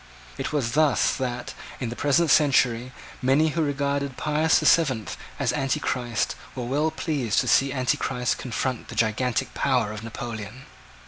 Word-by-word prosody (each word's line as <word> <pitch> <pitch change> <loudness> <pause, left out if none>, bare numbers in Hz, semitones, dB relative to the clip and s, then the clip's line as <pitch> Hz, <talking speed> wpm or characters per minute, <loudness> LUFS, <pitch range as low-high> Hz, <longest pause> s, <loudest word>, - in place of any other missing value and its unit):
It - - -3
was 135 -6 -1
thus 150 +1 +3
that, 125 -2 -4 0.3
in 125 - -3
the 120 - -5
present 150 +4 +2
century, 125 -4 +3 0.3
many 140 +5 +3
who 160 +2 -1
regarded 140 -2 -1
Pius 155 +1 +2
the - - -1
Seventh 130 -10 +3 0.2
as 130 -3 0
Antichrist 125 -3 -1 0.2
were 125 -2 -4
well 145 +6 +1
pleased 140 - -1
to - - -4
see 135 0 +4
Antichrist 125 -1 -1
confront 125 0 -3
the - - -9
gigantic 115 +2 0
power 125 -6 +1
of 105 0 -7
Napoleon. 115 0 -7
130 Hz, 150 wpm, -25 LUFS, 120-145 Hz, 0.3 s, see